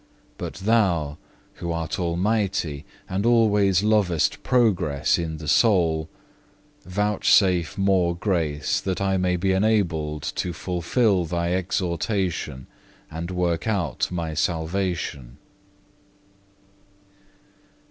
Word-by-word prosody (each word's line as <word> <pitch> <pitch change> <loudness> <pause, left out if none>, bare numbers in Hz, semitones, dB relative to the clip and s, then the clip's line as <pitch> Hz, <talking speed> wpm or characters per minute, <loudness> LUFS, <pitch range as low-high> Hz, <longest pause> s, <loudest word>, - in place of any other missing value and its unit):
But - - -5
Thou, 95 -8 +1 0.4
Who 85 -1 -4
art 80 -3 -3
Almighty, 90 -4 -1 0.2
and 95 +2 -2
always 105 -5 +3
lovest 100 -7 +1
progress 95 - +2
in 80 -2 -3
the 80 0 -8
soul, 80 -4 +3 0.8
vouchsafe 95 -3 +2
more 95 -3 +2
grace, 85 -6 -1
that 95 -2 -2
I 95 -1 +1
may 90 -1 +1
be 95 +2 0
enabled 90 -7 0
to 90 - -2
fulfil 90 +3 0
Thy 85 +1 -1
exhortation, 90 - -2 0.5
and 80 +2 -5
work 90 0 -1
out 95 - -1
my 85 -3 -3
salvation. 80 -6 -2
90 Hz, 95 wpm, -24 LUFS, 80-100 Hz, 0.8 s, always